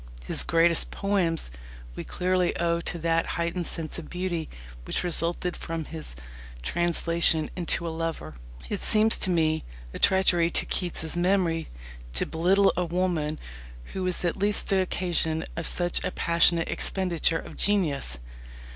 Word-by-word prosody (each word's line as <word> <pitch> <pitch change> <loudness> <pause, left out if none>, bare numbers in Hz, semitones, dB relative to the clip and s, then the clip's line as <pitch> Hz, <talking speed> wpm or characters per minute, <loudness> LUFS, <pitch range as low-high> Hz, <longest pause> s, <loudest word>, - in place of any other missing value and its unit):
His - - +2
greatest 165 0 +4
poems 180 - -1 0.4
we - - -5
clearly 180 0 0
owe 170 0 0
to 170 - -3
that 165 0 +1
heightened 170 +1 -1
sense 160 0 -4
of 160 - -10
beauty 175 -3 -3 0.3
which - - -2
resulted 175 +1 0
from 165 -1 -5
his 155 - -7 0.5
translation 170 - +2
into 170 -1 -2
a 165 - -3
lover. 165 - -4 0.3
It - - -3
seems 220 +1 +3
to 190 - +1
me 160 -2 +2 0.3
a - - -6
treachery 175 -3 +4
to - - +2
Keats's 170 -2 -1
memory 175 -2 +1 0.5
to - - +2
belittle 190 +5 +3
a 180 - 0
woman 170 -3 -1 0.6
who 190 - -3
was 180 0 -1
at 175 - 0
least 205 +1 +2
the 195 -1 +3
occasion 170 -3 -1
of 170 - -2
such 175 -1 0
a - - 0
passionate 170 -1 +2
expenditure 175 -3 0
of - - -9
genius. 150 - 0
170 Hz, 145 wpm, -26 LUFS, 165-180 Hz, 0.6 s, greatest